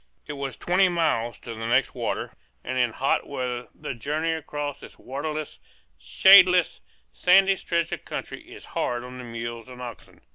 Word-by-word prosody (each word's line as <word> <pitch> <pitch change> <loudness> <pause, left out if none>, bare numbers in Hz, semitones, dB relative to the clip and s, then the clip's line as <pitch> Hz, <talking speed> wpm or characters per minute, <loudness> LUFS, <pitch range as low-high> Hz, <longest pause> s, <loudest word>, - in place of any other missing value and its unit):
It 150 - -6
was 140 -2 -5
twenty 185 +2 +3
miles 155 -9 0
to 115 - -7
the 115 0 -5
next 125 +3 +2
water, - - -3 0.3
and 130 - -4
in 120 -2 +2
hot 135 - 0
weather 125 -3 -4
the - - -6
journey 150 +7 -2
across 145 -3 -4
this - - -13
waterless, 150 +3 -5 0.4
shadeless, 180 - +6 0.3
sandy 195 - +5
stretch 170 -2 -1
of - - -5
country - - -6
is - - -11
hard 120 0 -1
on 125 0 -9
the - - -7
mules 115 0 -6
and 125 -1 -11
oxen. 120 -2 -10
135 Hz, 170 wpm, -25 LUFS, 120-165 Hz, 0.4 s, shadeless